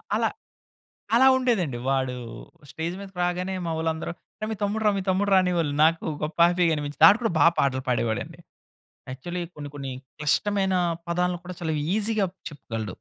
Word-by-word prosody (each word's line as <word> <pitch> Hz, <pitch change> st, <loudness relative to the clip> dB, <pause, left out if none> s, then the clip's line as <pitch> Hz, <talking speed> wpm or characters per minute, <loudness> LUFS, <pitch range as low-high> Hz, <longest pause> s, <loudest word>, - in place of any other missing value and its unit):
అల -, -, 0 dB, 0.9 s
అలా 260 Hz, +3 st, +6 dB
ఉండేదండి. 195 Hz, -, 0 dB
వాడు 130 Hz, -2 st, 0 dB, 0.6 s
స్టేజ్ 165 Hz, +2 st, -4 dB
మీదకు 195 Hz, -2 st, -10 dB
రాగానే 180 Hz, +2 st, -1 dB
మావోళ్ళందరూ 160 Hz, 0 st, -2 dB, 0.3 s
"అరే 215 Hz, -, -2 dB
మీ 220 Hz, -, -3 dB
తమ్ముడు 210 Hz, +2 st, 0 dB
రా, 210 Hz, -, +6 dB
మీ -, -, -2 dB
తమ్ముడు 200 Hz, +2 st, +1 dB
రా!" -, -, +7 dB
అనేవాళ్ళు 170 Hz, -5 st, 0 dB
నాకు 165 Hz, +1 st, +2 dB, 0.2 s
గొప్ప 155 Hz, +2 st, -4 dB
హ్యాపీగనిపించింది. 160 Hz, -4 st, +1 dB
వాడు 205 Hz, +6 st, +7 dB
కూడా 225 Hz, -, +1 dB
బాగా 170 Hz, -, +6 dB
పాటలు 130 Hz, -1 st, +1 dB
పాడేవాడండి. 115 Hz, -2 st, -1 dB, 0.7 s
యాక్చువల్లీ 175 Hz, +7 st, -5 dB
కొన్ని 145 Hz, -1 st, -7 dB
కొన్ని 135 Hz, -2 st, -5 dB, 0.3 s
క్లిష్టమైన 190 Hz, +5 st, +1 dB, 0.3 s
పదాలను 180 Hz, 0 st, 0 dB
కూడా 180 Hz, -1 st, -7 dB
చాలా 160 Hz, -2 st, -1 dB, 0.2 s
ఈసీ‌గా 215 Hz, -2 st, +1 dB, 0.2 s
చెప్పగలడు. 110 Hz, -8 st, -6 dB
170 Hz, 150 wpm, -25 LUFS, 145-190 Hz, 0.9 s, రా